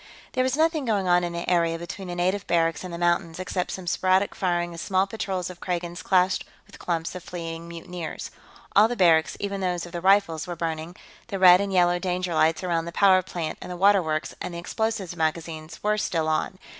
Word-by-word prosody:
There 255 - +2
was 260 +2 0
nothing 320 -1 +2
going 205 -5 0
on 175 0 +4
in 175 - -2
the 170 0 -5
area 170 -2 +2
between 170 +3 -7
the 175 - -5
native 185 +3 0
barracks 165 -1 +1
and 185 - -6
the 170 - -5
mountains 170 -1 0
except 185 0 -2
some 185 - -6
sporadic 185 +3 +2
firing 175 -2 -1
as 170 - -7
small 190 -1 +1
patrols 190 -3 -3
of 175 - -13
Kragans 175 -1 -3
clashed 185 0 +2 0.2
with - - -16
clumps 165 -2 -2
of 180 - -7
fleeing 165 -1 -6
mutineers. 170 0 -7 0.4
All 210 +2 +7
the 245 - -3
barracks, 165 -6 +3
even 200 -1 -3
those 180 -2 -1
of 175 - -11
the 175 -1 -5
Rifles, 190 -4 +3
were 175 - -4
burning; 165 +1 -4 0.3
the 200 -4 -4
red 185 0 +8
and 200 -1 -2
yellow 175 -1 +3
danger 180 -1 -2
lights 160 +2 +2
around 170 -2 0
the 170 - -5
power 190 +1 +5
plant 175 -3 -5
and - - -7
the 180 - -5
water 200 +1 +5
works 155 -1 -2
and 175 - -5
the - - -4
explosives 200 0 -2
magazines 160 0 -3
were 210 0 +1
still 165 -5 -1
on. 155 +4 -1
175 Hz, 220 wpm, -25 LUFS, 170-190 Hz, 0.4 s, red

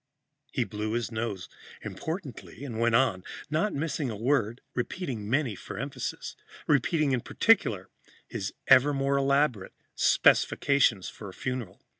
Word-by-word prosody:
He - - 0
blew 105 +1 -4
his 120 0 -2
nose 110 -5 -3 0.4
importantly 160 - -6
and 115 -5 -5
went 115 0 +3
on, 115 -7 +2 0.3
not 165 +7 +1
missing 145 -2 -2
a 110 - -4
word, 115 0 0
and - - -38
repeating 120 - -4
many 135 -2 +1
for - - -8
emphasis - - -5 0.3
repeating 150 +1 +2
in 125 -2 +1
particular 110 - +2 0.4
his - - -4
ever 140 +3 +6
more 140 0 +1
elaborate 140 -7 +1 0.2
specifications 125 -9 +3
for 105 - -8
a 95 - -12
funeral. 125 -7 -5
125 Hz, 140 wpm, -28 LUFS, 110-140 Hz, 0.4 s, ever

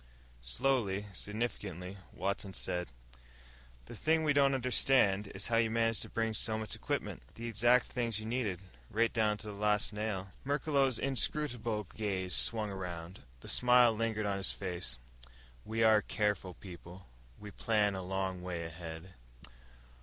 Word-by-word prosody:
Slowly, 100 - 0
significantly, 100 -3 -4
Watson 100 -1 -3
said, 90 0 -2 1.0
"The - - -9
thing 160 0 +2
we 150 -2 +3
don't 140 -1 +4
understand 125 -5 +3
is 100 0 -4
how 115 - +3
you 115 -1 +3
managed 115 0 +2
to - - -5
bring 115 -1 -1
so 110 +1 +1
much 110 -1 -3
equipment. - - -3
The 115 - -7
exact 120 +2 +4
things 115 -3 -1
you 110 - -6
needed 110 -6 -1 0.3
right 115 +1 +1
down 105 -2 +2
to 110 +1 -9
the - - -6
last 105 +1 +1
nail." 105 -3 -3
Merklos' 140 -2 +1
inscrutable 125 -5 0
gaze 95 -4 -1
swung 110 +1 +3
around. 90 -2 -6 0.2
The - - -11
smile 125 -1 +6
lingered 110 -1 -1
on 100 -1 0
his 95 - +2
face. 90 -10 -3 0.7
"We 115 +1 0
are 110 -1 +7
a - - +2
careful 105 -4 -1
people. 90 0 -11 0.3
We 105 -1 -9
plan 105 -1 +1
a 95 - -4
long 95 0 -2
way 90 -2 -4
ahead." 80 +2 -8
105 Hz, 155 wpm, -33 LUFS, 95-115 Hz, 1.0 s, are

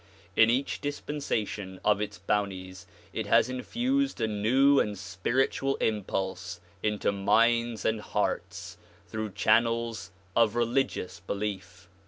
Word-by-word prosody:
In 115 0 +6
each 130 +4 0
dispensation 110 -10 -3
of 105 -1 +3
its 105 - -4
bounties 95 -1 -3 0.3
it - - -3
has 125 - +4
infused 250 - -1
a 115 - +2
new 125 +7 +4
and 105 -1 0
spiritual 120 +9 0
impulse 95 -4 -2 0.2
into 105 -1 0
minds 115 +2 +2
and 110 -1 +1
hearts - - -3 0.3
through 110 -2 -4
channels 115 -3 +1 0.3
of 115 -1 +4
religious 120 -5 0
belief. 95 -1 -5
110 Hz, 115 wpm, -28 LUFS, 95-120 Hz, 0.3 s, In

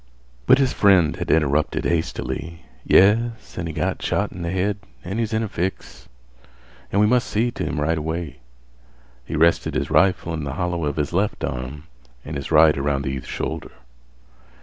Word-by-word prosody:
But - - +7
his 135 -2 +1
friend 95 -6 +4
had - - -4
interrupted 75 -1 +1
hastily. 85 0 -3 0.2
"Yes, 115 +4 +3
an' 85 -2 -4
he 80 - -5
got 75 -1 -2
shot - - -1
in 90 - -8
th' 85 - -2
head 95 +2 0 0.3
an' 95 +5 -4
he's 115 -1 -1
in 110 0 0
a - - -2
fix, 95 0 -5 0.8
an' 100 - +1
we 105 - +5
must 125 +2 +2
see 115 +3 0
t' - - -4
him 80 - -2
right 80 +2 0
away." 80 -3 -4 0.8
He 75 - -5
rested 85 +2 +2
his 70 +3 -2
rifle 85 +1 +2
in 80 -2 -3
the 70 -1 -4
hollow 90 -2 -2
of 75 -1 -2
his 75 0 -2
left 100 +4 0
arm 65 +3 -4 0.4
and 75 - -6
his 70 +2 -5
right 75 0 +6
around 70 0 -1
the 70 - -2
youth's 65 -1 -6
shoulder. - - -5
85 Hz, 185 wpm, -22 LUFS, 75-95 Hz, 0.8 s, But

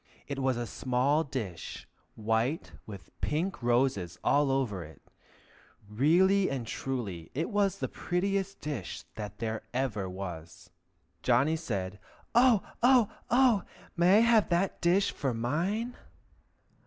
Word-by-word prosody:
It 140 -1 -4
was 130 -2 +1
a 120 - -2
small 130 +7 +1
dish, 115 - -6 0.3
white 115 +8 -1 0.2
with 100 -3 -10
pink 165 +2 -1
roses 120 -8 +1
all 145 -1 +3
over 125 -9 0
it; 80 +1 -13 0.9
really 175 - +3
and 130 -4 -3
truly, 110 -10 -4
it 160 +4 -2
was 200 -2 +1
the - - -2
prettiest 195 +2 -2
dish 140 - -5
that 105 -2 -6 0.4
ever 110 -8 -1
was. 90 -3 -8 0.5
Johnny 135 +6 +3
said, 100 - -4 0.3
"O 240 -3 +5 0.2
o 245 -3 +5 0.2
oh! 245 -5 +4 0.3
may 180 +4 +5
I - - +6
have 230 -2 +4
that 175 +2 0
dish 185 +3 +3
for 135 -5 -2
mine?" 180 - -1
135 Hz, 125 wpm, -30 LUFS, -, 0.9 s, I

